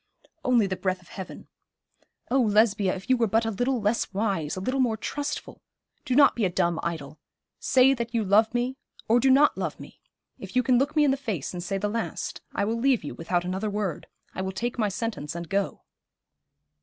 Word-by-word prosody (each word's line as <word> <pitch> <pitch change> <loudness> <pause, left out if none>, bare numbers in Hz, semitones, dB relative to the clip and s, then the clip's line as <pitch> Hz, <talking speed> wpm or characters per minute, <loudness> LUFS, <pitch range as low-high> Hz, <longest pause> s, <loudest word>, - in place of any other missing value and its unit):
'Only 245 -5 +4
the 190 -1 -2
breath 185 0 -1
of 175 - -20
heaven. 190 -2 -9 0.8
Oh, 265 +1 +4
Lesbia, 210 -3 +3
if 190 0 -9
you 260 - +4
were 230 -1 +2
but 225 +3 +2
a 225 - 0
little 245 +5 0
less 210 +2 0
wise, 195 -8 -1
a - - -4
little 255 +8 -1
more 235 -4 +2
trustful. 290 +6 -5 0.4
Do 255 - 0
not 280 +1 +6
be 235 - -1
a 190 - +3
dumb 175 -2 0
idol. 155 -3 -5 0.4
Say 260 +1 +5
that 235 -2 -4
you 230 -2 0
love 210 +3 +4
me, 245 +2 -1 0.3
or 230 +2 +4
do 265 - +3
not 280 +3 +5
love - - -3
me. - - -13 0.4
If - - -9
you 250 - +4
can 245 0 +4
look 285 +3 0
me 305 - +5
in 285 - +4
the 270 - 0
face 215 - -4
and 175 - -4
say 195 +2 -2
the 205 +2 -1
last, 225 +2 -4
I 200 - -1
will 225 +2 -1
leave 260 -4 +2
you 145 - -5
without 175 +1 -1
another 190 +4 -2
word. 200 -5 -3 0.3
I - - -4
will 190 0 -2
take 240 +5 -3
my 210 -2 +2
sentence 195 -8 -4
and 170 0 -5
go.' 200 +3 -2
220 Hz, 220 wpm, -26 LUFS, 190-250 Hz, 0.8 s, not